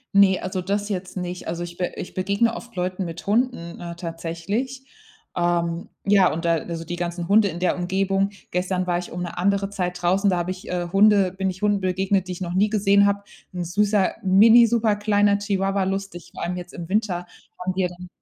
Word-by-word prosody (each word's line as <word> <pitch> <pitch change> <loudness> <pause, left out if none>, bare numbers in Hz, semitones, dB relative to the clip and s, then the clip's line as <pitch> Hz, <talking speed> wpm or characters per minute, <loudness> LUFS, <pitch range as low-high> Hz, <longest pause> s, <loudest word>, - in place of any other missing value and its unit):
Ne, 195 -2 +6
also, 185 0 -3
das 200 +3 -2
jetzt 185 -1 -4
nicht. 180 0 -5
Also, 170 +1 -3
ich 175 0 -8
be 180 - -1
ich - - -7
begegne 200 +5 +1
oft 235 0 -10
Leuten 185 +1 -2
mit 170 -1 -7
Hunden, 210 -6 0
äh, 170 -1 -6
tatsächlich. 175 +10 -4 0.5
Ähm, 175 -1 0 0.2
ja, 195 -2 +5
und 165 +2 -4
da 170 - +3
also, 165 +1 -5
die 175 +1 -5
ganzen 175 0 -3
Hunde 205 +2 +5
in 175 -2 -5
der 180 0 +1
Umgebung. 195 +2 0 0.2
Gestern 180 +1 -1
war 175 -1 0
ich 180 - -8
um 175 +1 -4
'ne 175 0 -6
andere 200 +1 +1
Zeit 180 -2 -3
draußen, 190 +3 +2
da 180 - +1
habe 175 +1 -1
ich, 185 0 -8
äh, 175 -1 -2
Hunde 200 -2 +5
bin 190 +1 -2
ich 185 +2 -7
Hunden 205 -1 +2
begegnet, 190 +1 0
die 180 - -3
ich 180 - -9
noch 175 -1 -3
nie 200 +3 +3
gesehen 200 -1 +4
habe. 200 0 0 0.3
'N 180 - -2
süßer 205 +2 +2
mini 220 +5 +7
superkleiner 205 -3 +2
Chihuahua, 195 -1 0
lustig, 195 -2 -4
vor - - -5
allem 180 +1 -2
jetzt 175 0 -8
im 170 -2 -6
Winter 190 -4 0 0.3
haben 185 +1 -2
die 190 - -1
ja 180 - +2
dann 180 +1 -11
185 Hz, 215 wpm, -23 LUFS, 175-200 Hz, 0.5 s, mini